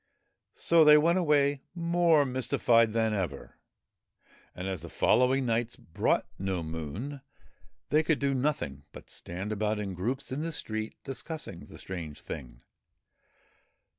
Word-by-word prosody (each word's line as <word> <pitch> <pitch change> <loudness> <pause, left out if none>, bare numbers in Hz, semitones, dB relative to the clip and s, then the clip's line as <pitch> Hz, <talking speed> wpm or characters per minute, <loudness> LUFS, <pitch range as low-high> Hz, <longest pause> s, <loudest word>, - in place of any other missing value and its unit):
So 165 -1 +5
they 150 0 +8
went 170 +4 +3
away 145 -4 +2
more 170 -3 +3
mystified 120 -3 +2
than 110 -1 +1
ever, 90 -9 -4 1.0
and, 90 +1 -5
as 95 -4 -3
the 85 - -8
follow 125 +9 +3
ing 135 0 +1
nights 115 0 0
brought 80 - 0
no 95 -3 -2
Moon, 80 - -5 0.7
they 155 +2 +5
could 160 -1 +1
do 140 -1 0
nothing 125 - -1
but - - -12
stand 95 +5 -6
about 105 0 0
in 100 -2 -4
groups 125 +11 -3
in 135 +3 -2
the 165 +1 -2
streets 110 -7 -4
discussing 135 - -6
the - - -12
strange 85 -5 -7
thing. - - -8
120 Hz, 140 wpm, -29 LUFS, 95-145 Hz, 1.0 s, they